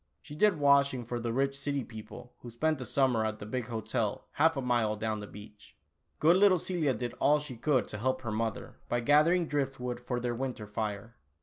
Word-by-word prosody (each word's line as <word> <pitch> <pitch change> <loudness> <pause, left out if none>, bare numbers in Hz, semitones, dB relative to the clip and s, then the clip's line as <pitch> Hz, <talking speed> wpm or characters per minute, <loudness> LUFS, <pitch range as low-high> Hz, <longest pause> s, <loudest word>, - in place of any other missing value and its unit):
She - - -12
did 195 +3 +3
washing 140 -3 +3
for 120 +1 -3
the 115 0 -2
rich 135 +3 0
city 140 -1 -2
people 110 +2 -11
who 120 - -9
spent 155 +6 0
the 130 - -5
summer 130 -5 +2
at 110 -1 -2
the 105 - -8
big 120 +2 -3
hotel 115 -3 -2
half 160 0 +2
a - - 0
mile 120 -4 +1
down 110 0 -2
the 105 - -7
beach. 105 0 -14 0.4
Good 165 +5 +5
little 195 -1 +6
Celia 160 -6 -1
did 120 +2 -4
all 150 +2 +4
she 145 -4 -7
could 130 +2 +1
to 105 - -6
help 130 +3 0
her 115 -3 -4
mother, 115 +2 -3
by 120 0 0
gathering 155 +7 +4
driftwood 135 -5 -2
for 125 0 -3
their 120 0 -2
winter 125 -3 -4
fire. 105 +2 -5
125 Hz, 210 wpm, -30 LUFS, 115-145 Hz, 0.4 s, little